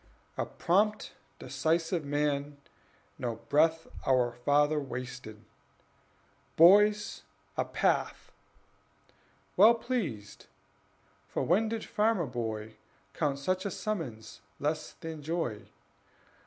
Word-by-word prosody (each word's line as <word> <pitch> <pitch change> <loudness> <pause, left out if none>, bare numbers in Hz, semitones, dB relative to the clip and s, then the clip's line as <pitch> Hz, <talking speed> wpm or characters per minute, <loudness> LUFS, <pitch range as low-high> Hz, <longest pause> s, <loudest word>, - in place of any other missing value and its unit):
A - - -2
prompt, 210 +4 +1 0.3
decisive 160 +6 -1
man, 145 0 -1 0.6
no 120 -3 -2
breath 160 +7 +2 0.2
Our 125 -2 +2
father 145 +5 +2
wasted: 125 -5 -7 1.1
"Boys, 205 +5 +5 0.3
a - - 0
path!" - - -1 1.2
Well 220 +5 +7
pleased, 195 - -4 0.8
(for - - -2
when 210 +6 +2
did 225 0 -4
farmer 210 -5 +1
boy 110 -3 -5 0.4
Count 140 -2 0
such 185 +7 -1
a 200 - -2
summons 165 - -5 0.2
less 155 +1 -2
than 160 -2 -8
joy?) 150 -9 -3
150 Hz, 95 wpm, -30 LUFS, 125-185 Hz, 1.2 s, Well